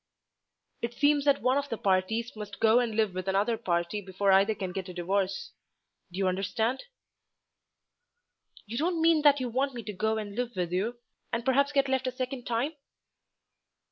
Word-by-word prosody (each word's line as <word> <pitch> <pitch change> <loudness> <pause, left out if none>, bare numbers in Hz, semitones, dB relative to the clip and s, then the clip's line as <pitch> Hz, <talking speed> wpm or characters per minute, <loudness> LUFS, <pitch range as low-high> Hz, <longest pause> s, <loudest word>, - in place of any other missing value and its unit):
"It 235 0 -3
seems 290 0 +3
that 280 -3 +3
one 255 +3 +3
of 285 0 -5
the 230 - -3
parties 205 +5 0
must 210 -1 -8
go 225 +2 +5
and 235 -3 -1
live 215 -4 +1
with 185 +1 -5
another 200 +4 +2
party 175 +1 -1
before 195 +1 0
either 195 +3 +4
can 190 -3 -4
get 185 0 -5
a 180 - -8
divorce. 190 +2 -1 0.6
Do 180 - -8
you 195 -1 +1
understand?" 220 - -1 1.8
"You 230 +3 -4
don't 340 +2 0
mean 325 -1 +4
that 290 -1 +5
you 255 - -2
want 260 +3 -1
me 235 - -5
to 210 - -6
go 220 +3 0
and 210 -2 -5
live 245 -1 -3
with 175 -2 -2
you, 210 +7 -1 0.3
and 235 +1 -2
perhaps 280 +2 +3
get 280 -1 +2
left 265 -1 0
a - - 0
second 255 0 -5
time?" 245 +6 0
225 Hz, 185 wpm, -29 LUFS, 195-260 Hz, 1.8 s, go